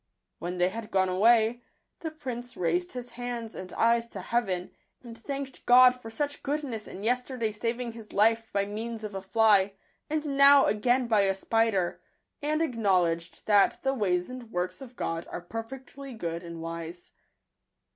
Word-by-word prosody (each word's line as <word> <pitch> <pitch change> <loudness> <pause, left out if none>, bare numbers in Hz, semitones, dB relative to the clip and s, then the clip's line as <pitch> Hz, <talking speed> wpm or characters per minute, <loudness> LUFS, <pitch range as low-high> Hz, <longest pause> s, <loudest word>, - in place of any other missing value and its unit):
When 180 +1 -4
they 180 +1 +3
had 220 +2 -7
gone 190 -1 +2
away, 225 +5 +4 0.4
the 320 - -4
prince 250 -6 -6
raised 175 +1 0
his 245 -1 -6
hands 240 -2 -5
and 185 -1 -7
eyes 235 0 +2
to 200 -5 -8
heaven, 190 -5 -1 0.3
and 235 -2 -9
thanked 275 +3 -6
God 250 +1 +8
i - - -15
for 225 - -9
such 290 +5 -3
goodness 275 -7 -3
in 195 - -9
yesterday 245 -1 0
saving 235 +3 -2
his 225 -2 -11
life! 225 +2 +2
by 200 0 +1
means 220 +2 -5
of 210 -1 -5
a 195 - -4
fly, 205 -1 +4 0.4
and 310 0 -1
n#w 280 -1 +7
again 245 +4 +2
by 220 -3 +3
a 195 -1 +2
spider, 205 -3 0 0.4
I 290 - -3
and 310 +2 +1
acknowledged 185 - 0
that 205 -2 +4
the 270 0 +1
ways 185 -5 0
and 250 -3 -9
works 180 +2 -3
of 255 -2 -10
God 165 -5 -3
are - - -5
perfectly 255 +7 -8
good 170 -5 -4
and 170 -1 -8
wise. 165 +1 -7
225 Hz, 175 wpm, -28 LUFS, 190-250 Hz, 0.4 s, God